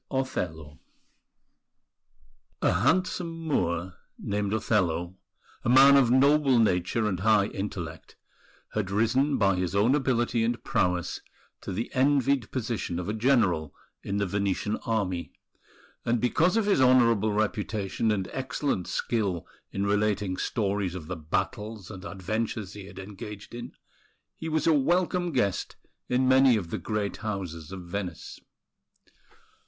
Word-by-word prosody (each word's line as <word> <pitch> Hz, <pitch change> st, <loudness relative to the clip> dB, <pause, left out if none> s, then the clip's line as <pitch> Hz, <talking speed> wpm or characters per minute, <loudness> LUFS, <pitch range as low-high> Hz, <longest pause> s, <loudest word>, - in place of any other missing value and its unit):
OTHELLO 80 Hz, -, -3 dB, 1.8 s
A -, -, +4 dB
handsome 180 Hz, -, +1 dB
Moor, 85 Hz, -, -1 dB, 0.2 s
named 100 Hz, 0 st, -2 dB
Othello, 95 Hz, -5 st, 0 dB, 0.5 s
a -, -, 0 dB
man 135 Hz, +3 st, +8 dB
of 135 Hz, -4 st, +5 dB
noble 135 Hz, +1 st, +4 dB
nature 105 Hz, 0 st, +2 dB
and 95 Hz, -4 st, -1 dB
high 105 Hz, 0 st, +4 dB
intellect, 95 Hz, -6 st, -6 dB, 0.6 s
had 105 Hz, -3 st, -1 dB
risen 115 Hz, +8 st, +2 dB
by 100 Hz, -2 st, +3 dB
his 90 Hz, +1 st, -2 dB
own 105 Hz, +6 st, +4 dB
ability 120 Hz, -4 st, +1 dB
and 120 Hz, +1 st, -1 dB
prowess 90 Hz, -1 st, 0 dB, 0.4 s
to -, -, -6 dB
the 110 Hz, +6 st, -3 dB
envied 135 Hz, -2 st, +2 dB
position 115 Hz, -8 st, -3 dB
of 90 Hz, 0 st, -4 dB
a -, -, -1 dB
general 110 Hz, -, +2 dB, 0.3 s
in 100 Hz, -, -3 dB
the 100 Hz, -, +1 dB
Venetian 100 Hz, +2 st, -1 dB
Army; 95 Hz, -6 st, -2 dB, 0.7 s
and 120 Hz, 0 st, +1 dB
because 165 Hz, -, +2 dB
of 225 Hz, -, +2 dB
his 200 Hz, -9 st, +3 dB
honourable 115 Hz, -4 st, +4 dB
reputation 105 Hz, +1 st, -1 dB
and 100 Hz, -3 st, 0 dB
excellent 130 Hz, -6 st, -2 dB
skill 100 Hz, -7 st, -1 dB, 0.3 s
in 100 Hz, +1 st, -2 dB
relating 100 Hz, -2 st, +1 dB
stories 100 Hz, -4 st, -1 dB
of 90 Hz, -4 st, -6 dB
the 90 Hz, -, -4 dB
battles 95 Hz, +6 st, -3 dB
and 95 Hz, -2 st, -9 dB
adventures 105 Hz, +1 st, -3 dB
he 100 Hz, -2 st, -9 dB
had 100 Hz, -, -13 dB
engaged 100 Hz, +2 st, -9 dB
in, 120 Hz, 0 st, -7 dB, 0.6 s
he 160 Hz, -, -5 dB
was 155 Hz, -1 st, 0 dB
a 165 Hz, -, +5 dB
welcome 175 Hz, +4 st, +1 dB
guest 110 Hz, -, -1 dB, 0.3 s
in 130 Hz, +1 st, +2 dB
many 130 Hz, -2 st, +6 dB
of 90 Hz, -5 st, -5 dB
the -, -, -2 dB
great 105 Hz, -2 st, -2 dB
houses 95 Hz, -7 st, -5 dB
of 95 Hz, -1 st, -6 dB
Venice. 90 Hz, -1 st, -6 dB
105 Hz, 135 wpm, -27 LUFS, 95-130 Hz, 1.8 s, man